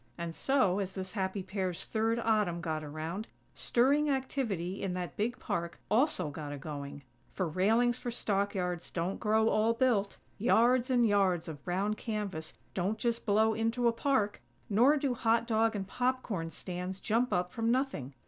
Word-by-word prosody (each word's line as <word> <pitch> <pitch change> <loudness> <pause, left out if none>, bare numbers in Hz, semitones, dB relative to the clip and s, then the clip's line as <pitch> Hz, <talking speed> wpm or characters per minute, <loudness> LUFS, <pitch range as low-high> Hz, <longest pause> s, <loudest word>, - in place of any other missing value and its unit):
And 170 -1 -5
so, 210 -9 +2
as 195 -1 -3
this 185 -1 -4
happy 190 -1 -2
pair's 190 -2 -3
third 225 +1 0
Autumn 215 -7 +1
got 160 -2 -3
around, 160 +8 -5 0.3
stirring 285 +5 +2
activity 230 -9 -2
in 190 -2 -2
that 180 -4 -4
big 235 +4 -1
park 170 -4 -3
also 220 - +2
got 145 0 -6
a 145 - -5
going; 140 -1 -7 0.3
for 185 - 0
railings 225 +9 +2
for 245 - -4
stockyards 195 -6 -1
don't 180 +3 -2
grow 220 +1 +3
all 220 +2 +3
built; 230 -6 +1 0.2
yards 240 +3 +4
and 245 -2 +4
yards 195 -5 +2
of 150 -3 -8
brown 195 +4 0
canvas 205 -8 -4 0.2
don't 195 +4 -1
just 235 0 -1
blow 220 +2 +4
into 230 +2 +1
a - - +5
park; 230 -4 0 0.3
nor 250 +9 +5
do 275 -3 0
"hot 230 -1 +2
dog" 225 -1 +2
and 195 -2 -3
popcorn 245 -9 -1
stands 180 +3 -5
jump 230 +5 +1
up 180 0 0
from 230 0 -1
nothing. 240 - -1
205 Hz, 165 wpm, -31 LUFS, 180-235 Hz, 0.3 s, a